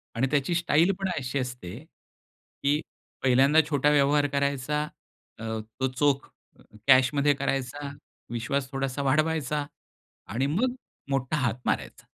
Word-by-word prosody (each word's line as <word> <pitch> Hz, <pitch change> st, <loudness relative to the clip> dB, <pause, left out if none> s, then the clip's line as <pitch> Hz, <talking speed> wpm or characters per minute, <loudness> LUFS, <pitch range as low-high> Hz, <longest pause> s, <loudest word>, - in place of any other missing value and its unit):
आणि 125 Hz, +4 st, +2 dB
त्याची 145 Hz, +4 st, +1 dB
स्टाईल 170 Hz, +1 st, +3 dB
पण 195 Hz, -1 st, -1 dB
अशी 135 Hz, 0 st, -2 dB
असते 125 Hz, -7 st, -5 dB, 0.9 s
की 145 Hz, +2 st, +3 dB, 0.4 s
पहिल्यांदा 135 Hz, +4 st, +5 dB
छोटा 145 Hz, -1 st, +3 dB
व्यवहार 145 Hz, 0 st, +4 dB
करायचा, 140 Hz, +1 st, 0 dB, 0.6 s
अ, 115 Hz, -, -7 dB, 0.4 s
तो 130 Hz, -, +2 dB
चोख 140 Hz, +1 st, +1 dB, 0.3 s
अ, -, -, -18 dB, 0.3 s
कॅश 130 Hz, -1 st, +7 dB
मध्ये 145 Hz, 0 st, +3 dB
करायचा, 140 Hz, +1 st, -2 dB, 0.4 s
विश्वास 130 Hz, +3 st, -2 dB
थोडासा 135 Hz, 0 st, -2 dB
वाढवायचा 150 Hz, 0 st, +1 dB, 0.7 s
आणि 130 Hz, +4 st, +1 dB
मग 245 Hz, -, 0 dB, 0.4 s
मोठा 135 Hz, +2 st, 0 dB
हात 125 Hz, -6 st, +1 dB
मारायचा. -, -, -2 dB
140 Hz, 130 wpm, -27 LUFS, 130-150 Hz, 0.9 s, कॅश